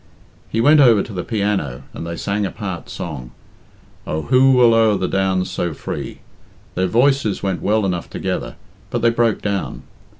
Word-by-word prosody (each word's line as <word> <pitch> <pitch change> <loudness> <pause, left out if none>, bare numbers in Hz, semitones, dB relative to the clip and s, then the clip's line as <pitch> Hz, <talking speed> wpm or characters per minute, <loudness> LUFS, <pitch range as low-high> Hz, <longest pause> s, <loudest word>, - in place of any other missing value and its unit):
He 115 - 0
went 150 +5 +6
over 115 -7 +6
to - - -9
the 90 -2 -3
piano 100 - -2
and 85 - -6
they 85 0 -5
sang 100 +4 -1
a 100 - -1
part 95 -5 -6
song, 70 -8 -6 0.8
"Oh, 80 +1 -2
who 130 +1 +4
will 120 -2 +5
o'er 110 -2 +4
the 95 - -1
downs 95 -1 0
so 85 -3 -2
free?" - - -6 0.5
Their 95 +1 0
voices 120 0 +2
went 95 -2 -1
well 105 0 +1
enough 90 -3 -2
together, - - -4 0.3
but - - -2
they 115 - +5
broke 115 -2 +1
down. 100 -2 -3
100 Hz, 175 wpm, -19 LUFS, 90-115 Hz, 0.8 s, went